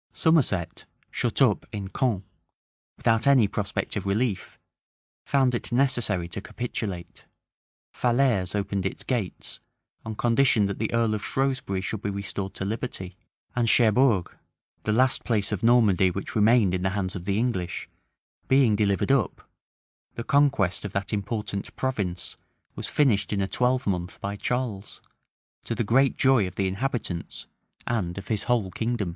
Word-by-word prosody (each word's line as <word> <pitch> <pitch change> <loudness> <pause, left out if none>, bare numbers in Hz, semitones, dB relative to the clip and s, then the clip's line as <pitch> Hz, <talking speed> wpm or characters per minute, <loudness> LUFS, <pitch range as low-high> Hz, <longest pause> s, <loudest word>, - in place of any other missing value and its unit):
Somerset, 110 - +1 0.3
shut - - +1
up - - +2
in 100 -2 -5
Caen, 110 -5 0 0.7
without 115 +3 +2
any 130 -6 +6
prospect 105 +2 -3
of 100 -2 -3
relief, 100 -1 -1 0.7
found 130 -3 +3
it 120 - -3
necessary 120 -8 +1
to 95 +3 -5
capitulate: 100 -7 -5 0.7
Falaise 120 -7 +1
opened 100 -1 -1
its - - -7
gates, 115 -8 -3 0.4
on 110 -1 -5
condition 120 -2 +3
that 100 0 -3
the 110 - -1
earl 115 -2 +2
of 105 - -3
Shrewsbury 130 -8 -1
should 105 +1 -4
be 105 - -2
restored 100 -1 -4
to 95 - -4
liberty: 100 -4 -4 0.4
and 120 -2 +2
Cherbourg, 115 -4 +3 0.5
the 110 - +1
last 130 +4 +2
place 105 -4 0
of 105 - -2
Normandy 110 -6 +4
which 95 +2 -5
remained 110 -3 +4
in 90 - -1
the 95 - +1
hands 95 -2 -2
of 90 -2 -6
the 100 0 0
English, 105 -7 -2 0.6
being 130 -5 +4
delivered 100 +3 +1
up, 135 -5 0 0.7
the 115 - -4
conquest 135 -10 +2
of 105 -2 -6
that 100 +2 -2
important 105 -1 -3
province 100 -10 -2 0.4
was - - -4
finished 125 -9 +2
in 105 - 0
a 95 - 0
twelvemonth 100 -8 0
by 100 +1 -4
Charles, 110 -3 -3 0.6
to 115 - -3
the 120 - 0
great 130 +5 +3
joy 130 -7 +4
of 90 - -9
the 95 - 0
inhabitants, 95 -4 -3 0.4
and 100 -7 -2
of 100 - -8
his 110 -3 -1
whole 115 -6 +1
kingdom. 115 -2 -2
105 Hz, 150 wpm, -26 LUFS, 95-125 Hz, 0.7 s, any